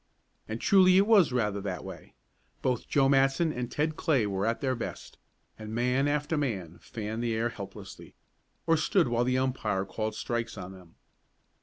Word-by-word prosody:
And 110 +1 -4
truly 185 +2 +5
it 195 - +5
was 205 -9 +5
rather 105 -5 0
that 95 -2 -4
way. - - -10 0.5
Both 125 -3 -1
Joe 135 -2 +3
Matson 135 +4 +3
and 125 -1 -4
Ted 155 +3 -1
Clay 135 -9 +2
were 100 0 -1
at 115 - 0
their 130 -2 0
best, 115 - -7 0.4
and 110 0 -6
man 125 +4 +1
after 150 +2 0
man 95 - -3
fanned 110 -1 -5
the 115 -2 -1
air 115 +2 0
helplessly, 100 -4 -10 0.5
or 165 -1 +3
stood 170 +1 +2
while 120 0 +1
the 130 +1 +1
umpire 110 -7 -1
called 110 +3 -4
strikes 115 -1 -3
on 95 -1 -7
them. 90 -3 -15
120 Hz, 175 wpm, -29 LUFS, 105-140 Hz, 0.5 s, truly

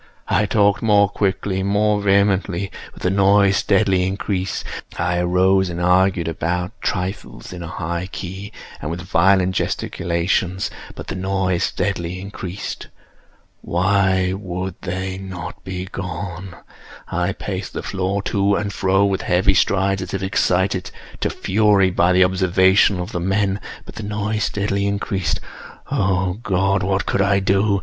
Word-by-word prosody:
I 105 - +2
talked 100 -1 +3
more 105 -2 +4
quickly—more 100 +1 0
vehemently; 100 -1 +2 0.2
but - - -14
the 90 - +2
noise 100 0 +4
steadily 95 -2 +2
increased. 95 -1 -2 0.3
I 90 +1 0
arose 95 +2 +3
and 85 0 -4
argued 90 -1 +3
about 90 +2 -2
trifles, 90 +1 -4
in 90 - -7
a 85 - -5
high 85 +1 -3
key 95 +3 -6 0.3
and 75 - -4
with 85 +2 -4
violent 95 +1 +3
gesticulations; 90 +2 -1 0.2
but - - -7
the - - -5
noise 95 -1 0
steadily 90 -2 -2
increased. 95 -1 -6 0.7
Why 95 0 +2
would 95 -1 -4
they 95 +1 -4
not 95 -1 -7
be 90 -1 -5
gone? 90 0 -6 0.5
I - - 0
paced - - -5
the - - -4
floor 95 +1 -2
to 100 -1 +1
and 100 0 -2
fro 95 +1 +2
with 95 -1 0
heavy 95 +2 +3
strides, 95 0 +2
as 95 +1 -4
if 95 - -3
excited 95 -1 +1 0.3
to - - 0
fury 100 -2 +3
by 90 0 +3
the 90 +1 +5
observations 95 +1 +3
of 90 +5 -6
the 90 - -2
men—but 95 +2 -2
the - - -7
noise 105 0 -1
steadily 100 -1 -1
increased. 100 -3 -1 0.5
Oh 95 0 0
God! 95 -1 +1
what 95 0 0
could - - +1
I 100 0 +3
do? 100 +1 +2
95 Hz, 140 wpm, -20 LUFS, 90-100 Hz, 0.7 s, the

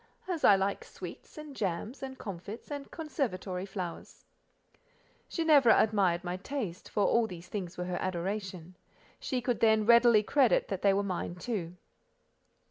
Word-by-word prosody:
"As 350 -4 -3
I 200 - +8
like 195 +1 -1
sweets, - - -10
and 300 -2 -9
jams, 210 +6 -3
and 265 -1 -6
comfits, 200 - -8
and 285 -1 -5
conservatory 210 - -3
flowers." 180 -4 -7 1.0
Ginevra 300 -8 +5
admired 195 -5 +2
my 180 0 -3
taste, 195 -4 -5
for 205 - +1
all 235 -1 +3
these 180 -3 -9
things 185 -4 -5
were 180 - -3
her 180 -1 -3
adoration; 185 -1 -4 0.4
she 255 -2 -2
could 245 -1 -1
then 220 -1 +4
readily 235 -1 +6
credit 260 +2 +3
that 195 -2 -3
they 200 - +5
were 200 +1 +1
mine 180 -2 -3
too. 180 -4 -4
205 Hz, 150 wpm, -30 LUFS, 185-245 Hz, 1.0 s, I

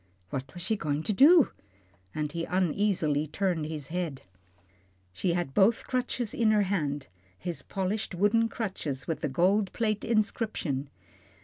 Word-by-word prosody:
What 135 -1 -4
was 175 - -6
she 220 - +1
going 150 -5 -2
to 210 - 0
do? 295 - +7 0.6
and 150 -1 -2
he 165 +1 -3
uneasily 175 -4 +1
turned 170 -1 -1
his 150 -4 -5
head. 165 -5 -3 0.9
She 170 - 0
had 175 -6 -2
both 205 +7 +5
his - - -13
crutches 250 -3 -2
in 230 -2 +2
her 210 -1 +4
hand 150 -8 -1 0.3
his 175 -2 -4
polished 195 0 -3
wooden 220 +5 +3
crutches 155 - -4
with 165 - -2
the - - -1
gold 190 +8 +2
plate 215 -3 0
inscription. 215 - -1
180 Hz, 150 wpm, -29 LUFS, 150-215 Hz, 0.9 s, do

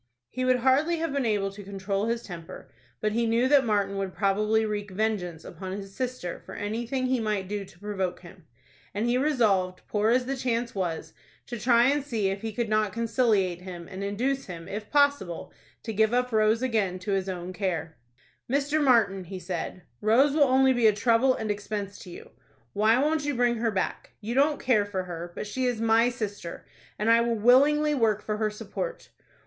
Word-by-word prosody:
He 255 - -3
would 255 0 +4
hardly 285 +7 +3
have 325 -1 -2
been 275 -4 0
able 200 -2 0
to 200 +1 -10
control 195 +1 -2
his 235 0 -1
temper, 170 -3 -10 0.3
but 215 - +1
he 230 +2 +1
knew 230 +3 +2
that 280 0 +5
Martin 200 -2 0
would 190 -1 -4
probably 210 +2 +2
wreak 210 -1 -3
vengeance 185 -5 -2
upon 190 -1 -7
his 195 0 -7
sister 250 -9 -4
for - - -10
anything 235 +5 -2
he 255 -1 +1
might 210 -4 -1
do 205 0 -3
to 185 - -16
provoke 190 -3 -3
him, 175 -2 -15 0.5
and 210 +3 0
he 245 +1 +2
resolved, 210 -11 +1
poor 210 +1 +1
as 250 +2 +3
the 270 +2 -2
chance 240 -2 -1
was, 175 -5 -3 0.3
to 240 -2 -6
try 235 0 +4
and 285 +2 +2
see 225 -8 -1
if 195 +1 -4
he 225 - -3
could 230 +2 -2
not 215 -2 +1
conciliate 220 -6 +1
him, 175 -2 -8
and 195 0 -6
induce 255 +7 -1
him, 170 -3 -8
if 210 +1 -6
possible, 285 - +1 0.3
to 225 - -4
give 220 +3 +2
up 250 0 +1
Rose 220 +2 +2
again 215 -7 0
to 185 +3 -5
his 195 -1 0
own 180 0 -5
care. 170 -5 -3 0.6
"Mr. 290 +2 +1
Martin," 205 -8 +3
he 190 +2 -7
said, 180 0 -5 0.2
"Rose 245 +7 +4
will 295 -1 +5
only 265 0 +4
be 240 -3 +4
a 215 - +5
trouble 235 +4 +3
and 215 -1 -2
expense 205 -1 -5
to 185 - -11
you. 175 - -11 0.4
Why 220 +3 +4
won't 300 +3 +1
you 290 -1 -1
bring 240 -1 +2
her 225 0 0
back? 190 -4 -3
You 220 +3 -4
don't 290 +3 +3
care 215 -6 +2
for 190 -2 -3
her; 175 -1 -7
but - - -4
she 250 +5 -2
is 245 -3 -1
my 230 +1 +4
sister, 205 -7 -6 0.3
and 210 - -2
I 230 0 +6
will 235 -1 0
willingly 290 +7 +5
work 220 -6 +1
for 215 -1 -2
her 215 0 0
support." 485 - -6
215 Hz, 205 wpm, -27 LUFS, 195-250 Hz, 0.6 s, I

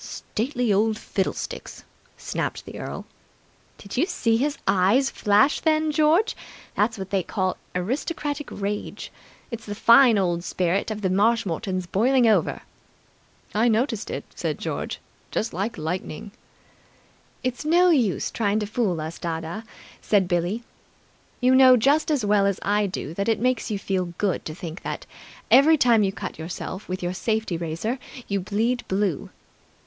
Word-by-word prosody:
"Stately 245 -1 -2
old 215 +2 +2
fiddlesticks!" 195 -3 -4 0.3
snapped - - -4
the - - -8
earl. - - -6 0.7
"Did 200 - -8
you 320 +8 +3
see 230 - +1
his 285 +5 0
eyes 205 +9 +3
flash 210 +7 +3
then, 310 -1 +2
George? 315 +8 +3 0.4
That's 220 +2 +1
what 190 -1 -7
they 195 -1 +2
call 185 +1 -1 0.2
aristocratic 290 - -2
rage. 205 +1 -4 0.4
It's 230 -1 -7
the 205 - -4
fine 235 +1 +6
old 175 -3 0
spirit 185 +3 0
of 215 -1 -4
the 190 - +2
Marshmoretons 190 -3 +1
boiling 240 +8 +3
over." 220 - +2 0.9
"I 220 +3 +3
noticed 230 0 0
it," - - -4
said - - -3
George. - - -4 0.3
"Just 220 - -2
like 200 +6 -3
lightning." 180 +5 -4 1.1
"It's 250 +2 -2
no 350 +4 +4
use 240 - +1
trying 210 -2 0
to - - -1
fool 205 -5 -1
us, 160 +2 -6
dadda," 165 +6 -4 0.4
said 200 -4 +2
Billie. 175 +6 -1 0.8
"You 255 +1 +4
know 260 -1 +8
just 285 +8 +3
as 285 -8 +1
well 205 -1 +3
as 200 - -1
I 205 +1 +2
do 170 -5 -5
that 200 +5 -1
it 225 - +2
makes 250 0 0
you 210 - -1
feel 185 -3 -2
good 200 -3 -1
to 155 - -5
think 170 0 -7
that, - - -5 0.5
every 310 +4 +7
time 235 -5 +4
you 195 -2 +2
cut 195 - -7
yourself 180 +4 -6
with 185 0 -4
your 175 +1 -1
safety 215 -1 -1
razor, 170 +10 -3 0.3
you 200 -1 0
bleed 220 +6 -1
blue!" 190 -5 -1
210 Hz, 155 wpm, -24 LUFS, 185-250 Hz, 1.1 s, know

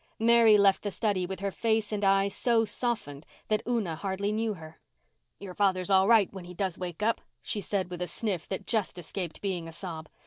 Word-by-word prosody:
Mary 230 -1 +6
left 200 -1 +4
the 205 - -2
study 195 -3 -1
with 190 0 -6
her 200 0 -1
face 220 0 0
and 210 -1 -2
eyes 195 0 +3
so 230 0 +2
softened 210 - -2 0.3
that 215 -1 +2
Una 220 -9 0
hardly 195 +4 -2
knew 220 0 -1
her. 160 -2 -12 0.6
"Your 195 -2 -8
father's 185 -1 +1
all 190 0 +5
right, 220 -4 +5
when 190 -2 -8
he 180 0 -10
does 185 -1 -1
wake 180 +1 -5
up," 230 +1 +1 0.2
she 205 - -2
said 190 -3 -2
with 180 0 -6
a 180 - -1
sniff 180 -1 -3
that 195 0 -4
just 215 -5 0
escaped 175 0 -6
being 185 -4 -2
a - - -8
sob. 160 -2 -6
195 Hz, 210 wpm, -29 LUFS, 180-215 Hz, 0.6 s, Mary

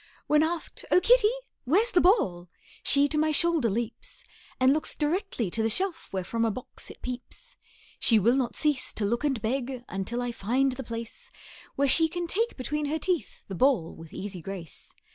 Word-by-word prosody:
When 300 0 +4
asked, 325 +1 -2
"O - - +6
kitty, 450 +3 +5 0.4
where's 400 - +3
the 350 - +4
ball?" 180 - +2 0.3
She 280 +1 +5
to 300 +1 0
my 310 0 +2
shoulder 325 -5 +2
leaps, 235 - -4 0.4
And 260 +1 +5
looks 310 - -2
directly 300 - -1
to 225 - 0
the 225 - +1
shelf, 370 - -1
Where 190 -1 -2
from 230 +5 -2
a 225 - +2
box 245 +4 -8
it - - -13
peeps. 255 - -7 0.4
She 225 - +5
will 230 +5 +4
not 260 -3 -1
cease 295 -4 0
to 210 - -2
look 235 +6 -1
and 275 -5 +1
beg, 250 +2 -2
Until 210 +6 -3
I 245 - -2
find 250 +5 +1
the 260 +1 -6
place 230 -1 -6 0.5
Where 280 - +2
she 325 +4 +5
can 350 +1 -3
take 450 +7 0
between 295 +3 -2
her 310 +2 0
teeth 345 - -2
The 195 - -6
ball 230 -5 +2
with 165 -1 -12
easy 190 -3 -6
grace. 175 -4 -8
260 Hz, 195 wpm, -27 LUFS, 225-320 Hz, 0.5 s, O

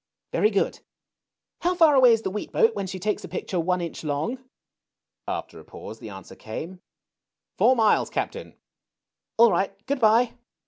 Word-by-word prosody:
^^Very 425 - +3
good. - - 0 0.8
How 355 +1 0
far 325 -4 +5
away 260 -3 +7
is 225 -1 +2
the 190 - -2
wheat 210 - -5
boat 455 -1 +3
when 195 - -4
she 190 0 -5
takes 210 +3 -2
a - - -6
picture 180 - -3
one 180 +2 0
inch 170 -1 -6
long? 155 - -3 0.4
'' - - -62
After - - -10
a - - -13
pause 110 - -10
the 110 - -9
answer 95 -1 -11
came: 165 +12 -8 0.8
Four 260 - +5
miles, 220 -3 +3
Cap - - -2
tain.'' - - -10 0.8
All 230 -1 +7
right. 190 +3 +1
Good 280 +1 -1
by." 230 +1 +4
210 Hz, 180 wpm, -25 LUFS, 175-255 Hz, 0.8 s, away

